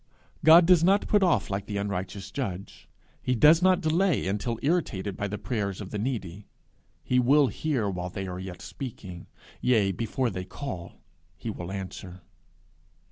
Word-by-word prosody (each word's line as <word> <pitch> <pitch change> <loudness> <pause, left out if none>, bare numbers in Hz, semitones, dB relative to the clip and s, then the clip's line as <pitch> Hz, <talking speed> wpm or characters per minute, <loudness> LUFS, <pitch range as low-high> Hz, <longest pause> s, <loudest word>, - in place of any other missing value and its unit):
God 165 +3 +8
does 175 -2 +5
not 195 +3 +3
put 210 - +3
off 170 - +2
like 100 +1 -3
the 100 - -3
unrighteous 100 0 -4
judge; 100 -9 -6 0.3
he 125 - 0
does 155 +8 +6
not 185 0 +4
delay 170 +1 +1
until 105 +4 -2
irritated 115 - -1
by 100 - -3
the 105 +1 -4
prayers 100 -6 -3
of 100 -3 -7
the 105 - -3
needy; 105 -5 -4 0.6
he 125 - +2
will 135 +2 +4
hear 130 -1 -1
while 90 -2 -3
they 95 +1 -5
are 90 -1 -5
yet 95 -1 -8
speaking; 95 -9 -8 0.3
yea, 110 -6 +3
before 115 +5 -2
they 95 -1 -4
call 90 -3 -7 0.4
he 115 - -5
will 90 -2 -7
answer. 95 -1 -7
105 Hz, 165 wpm, -27 LUFS, 95-140 Hz, 0.6 s, God